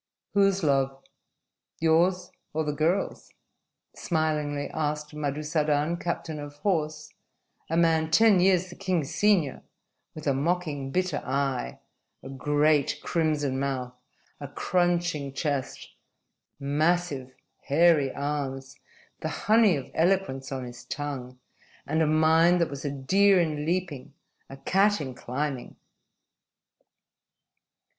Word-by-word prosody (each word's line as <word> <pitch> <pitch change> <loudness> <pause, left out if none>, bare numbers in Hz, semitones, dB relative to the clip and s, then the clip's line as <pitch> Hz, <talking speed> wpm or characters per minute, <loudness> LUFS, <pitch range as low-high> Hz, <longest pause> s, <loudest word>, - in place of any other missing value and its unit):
"Whose 195 -2 +3
love 135 -2 +1 0.8
yours 170 +3 +2 0.2
or 160 +1 0
the 150 -1 -2
girl's?" 165 +6 -1 0.6
smilingly 150 -3 -1
asked 150 -1 -2
Madusadan, 150 +1 0
captain 165 -3 -4
of 145 0 -8
horse, 155 -5 -1 0.6
a 165 - 0
man 160 -2 +3
ten 215 +1 +5
years 185 -1 +3
the - - -10
king's 180 -7 -2
senior, 195 -10 +2 0.5
with 155 - -8
a 140 - +2
mocking, 145 -1 -1
bitter 185 +5 -1
eye, 135 - -2 0.5
a 135 - -8
great, 145 +1 +1
crimson 150 -5 0
mouth, 130 -2 -3 0.5
a 145 - -6
crunching 170 -3 0
chest, 140 -2 -3 0.7
massive, 145 -2 0 0.3
hairy 150 -2 +4
arms, 140 -2 -4 0.4
the - - -3 0.2
honey 215 -4 +5
of 135 - -8
eloquence 165 -7 0
on 130 -1 -3
his 120 -1 -9
tongue, 135 -4 -5 0.5
and 160 +2 0
a 160 - +3
mind 160 +3 +4
that 170 - 0
was 140 -1 -6
a 145 - -1
deer 190 +9 +3
in 155 -3 -1
leaping, 165 -7 -3 0.3
a 135 - -9
cat 200 +8 +2
in 130 -3 -5
climbing. 130 +1 -4
150 Hz, 115 wpm, -27 LUFS, 140-175 Hz, 0.8 s, ten